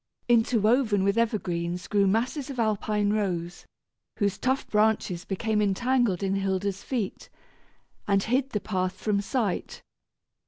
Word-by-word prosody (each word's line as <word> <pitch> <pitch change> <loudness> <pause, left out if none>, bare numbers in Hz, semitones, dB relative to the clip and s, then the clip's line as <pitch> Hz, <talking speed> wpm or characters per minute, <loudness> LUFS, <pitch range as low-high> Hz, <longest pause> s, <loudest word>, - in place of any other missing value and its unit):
Interwoven 225 -2 +3
with 200 +1 +2
evergreens, 180 -6 -1
grew 200 -2 +2
masses 250 +7 0
of 270 - -6
alpine 210 -1 +1
rose, 175 -5 -2 0.5
whose 200 -3 0
tough 260 +1 0
branches 210 -5 +1
became 210 +2 -1
entangled 215 -1 +1
in 195 0 0
Hilda's 195 0 -1
feet, 230 -8 -4 0.8
and 200 -1 +2
hid 255 +4 +1
the 210 - -2
path 185 -3 -2
from 205 -2 0
sight. 210 -2 -2
210 Hz, 125 wpm, -27 LUFS, 195-230 Hz, 0.8 s, Interwoven